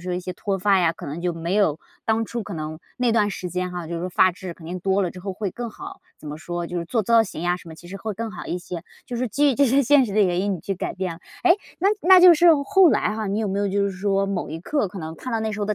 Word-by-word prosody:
说 180 +1 -3
一 180 - -2
些 185 0 -5
脱 195 +2 -3
发 195 +1 +3
呀， 170 -2 +3
可 - - -11
能 145 +4 -5
就 175 0 -1
没 165 +3 -3
有 180 -8 +2 0.3
当 225 0 +1
初 235 +1 -4
可 205 - -7
能 155 0 -5 0.2
那 245 -2 +1
段 215 -2 +3
时 180 -2 -5
间 180 +1 -2
哈， 175 -2 -5
就 170 - -5
是 - - -4
说 180 - -3
发 185 +1 +4
质 185 -1 -8
肯 165 - -13
定 180 +2 -5
多 195 +2 +1
了 180 - -1
之 180 - -10
后 195 +1 -4
会 200 0 -3
更 240 +5 -5
好。 - - -10 0.2
怎 - - -12
么 150 +1 -6
说， 175 +1 -4
就 175 +1 -4
是 170 - -3
做 225 +4 0
造 230 +2 +5
型 175 -5 -7 0.2
什 175 - -14
么 - - -9
呀 - - -18
其 175 - -13
实 195 - -7
会 215 0 -4
更 225 +3 -4
好 - - -8
一 - - -2
些， 175 -1 -7 0.2
就 245 - -5
是 250 +1 -1
基 285 +5 +3
于 - - -2
这 280 - +4
些 270 +3 +3
现 275 0 +5
实 200 - -5
的 215 - +4
原 180 -2 +1
因 200 0 0
你 175 - -7
去 195 - -3
改 185 - -4
变 185 -2 -3
了。 - - -14 0.3
诶？ 355 - +7 0.3
那 385 - +4
那 370 +2 +7
就 360 -1 +10
是 340 +3 +4 0.2
后 385 +1 +5
来 215 -2 +1
哈， 220 -1 -3
你 200 +2 -1
有 215 - -1
没 195 +1 -1
有 200 0 0
就 200 +1 +1
是 200 - 0
说 195 +1 0
某 195 -3 -3
一 160 - -5
刻 280 - -1
可 190 - -9
能 160 -1 -6
看 255 - -7
到 225 - 0
那 220 0 -2
时 210 - -5
候 205 - -1
的 210 - 0
195 Hz, 360 characters per minute, -23 LUFS, 175-225 Hz, 0.3 s, 就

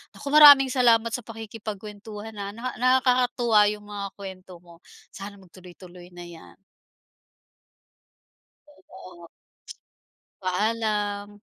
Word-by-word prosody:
Naku, - - -11
maraming 285 -3 +8
salamat 235 -3 +2
sa 240 - -3
pakikipagkuwentuhan 215 -1 -9
ha, 200 +1 -6
naka 250 +3 -5
nakakatuwa 250 -2 +2
'yong 210 0 -4
mga 205 -1 -7
kuwento 190 -2 -11
mo. 170 -1 -18 0.3
Sana 200 +1 -10
magtuloy-tuloy 180 -1 -15
na 175 - -9
'yan. 170 -2 -14 2.3
Oo. 185 -2 -14 1.1
Paalam. 205 +1 -2
210 Hz, 95 wpm, -24 LUFS, 190-230 Hz, 2.3 s, maraming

